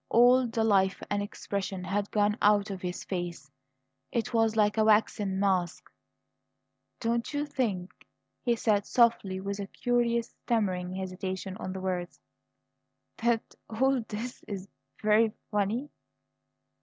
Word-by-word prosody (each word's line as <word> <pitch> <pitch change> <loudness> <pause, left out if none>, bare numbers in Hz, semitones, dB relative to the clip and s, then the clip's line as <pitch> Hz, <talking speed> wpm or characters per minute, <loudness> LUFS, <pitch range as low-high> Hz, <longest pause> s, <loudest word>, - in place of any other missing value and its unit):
All 245 +2 +6
the 230 -1 0
life 195 -3 +3
and 205 0 +1
expression 200 -2 -4
had 200 +2 -1
gone 210 0 +2
out 205 -1 +4
of 190 -2 -6
his 180 -1 -4
face; 175 -6 -5 0.6
it 235 +1 -1
was 225 -1 +3
like 210 -1 +3
a 220 - +3
waxen 210 -2 +2
mask. 185 -3 0 1.1
"D 230 - -3
don't 235 0 0
you 290 0 -1
think," 215 -11 -3 0.3
he 240 -1 +2
said 210 -3 +1
softly, 230 -6 +3
with 200 +1 -4
a 200 - -4
curious 235 +1 0
stammering 185 -6 0
hesitation 190 0 -4
on 185 - -5
the 190 0 -5
words, 180 -2 -3 1.0
"th 235 0 +3
that - - -24
all 260 +2 +2
this 235 +4 -6
is 195 -2 -5
v - - -31 0.3
very 215 +1 +4 0.2
funny?" 210 +7 0
205 Hz, 145 wpm, -29 LUFS, 190-230 Hz, 1.1 s, All